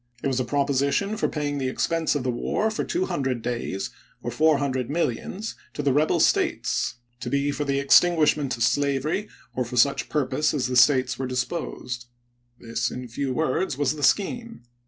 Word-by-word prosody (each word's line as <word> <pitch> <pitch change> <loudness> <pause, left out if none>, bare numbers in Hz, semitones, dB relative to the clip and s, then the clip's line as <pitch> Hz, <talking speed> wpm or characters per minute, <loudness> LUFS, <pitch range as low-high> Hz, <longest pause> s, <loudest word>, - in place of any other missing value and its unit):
It - - +1
was 130 -1 0
a - - +1
proposition 140 - +1
for - - 0
paying 145 -2 -2
the 130 -1 -1
expense 165 +4 0
of 145 - -1
the 130 - 0
war 210 - -1
for 215 - -2
two 360 +2 -1
hundred 130 - -2
days, 115 -5 -3 0.3
or 120 - -3
four 155 +4 +4
hundred 130 -3 -1
millions, 170 - -2 0.2
to 145 - -3
the 140 -2 +2
rebel 150 +3 +2
States, - - +1 0.2
to 125 0 -4
be 140 +2 +1
for 145 +1 -3
the 140 -1 0
extinguishment 150 -2 +4
of 115 - 0
slavery 145 - 0 0.2
or 125 - 0
for 125 +1 -6
such 140 +3 +3
purpose 150 +1 0
as 130 -3 0
the 125 +1 -2
States 130 0 +4
were 130 - -2
disposed. 125 -2 -4 0.5
This, 115 0 -2
in 125 0 -6
few 135 +3 -2
words, 155 +2 0
was 145 +1 +1
the 150 - -7
scheme. 230 - 0
140 Hz, 185 wpm, -25 LUFS, 125-155 Hz, 0.5 s, four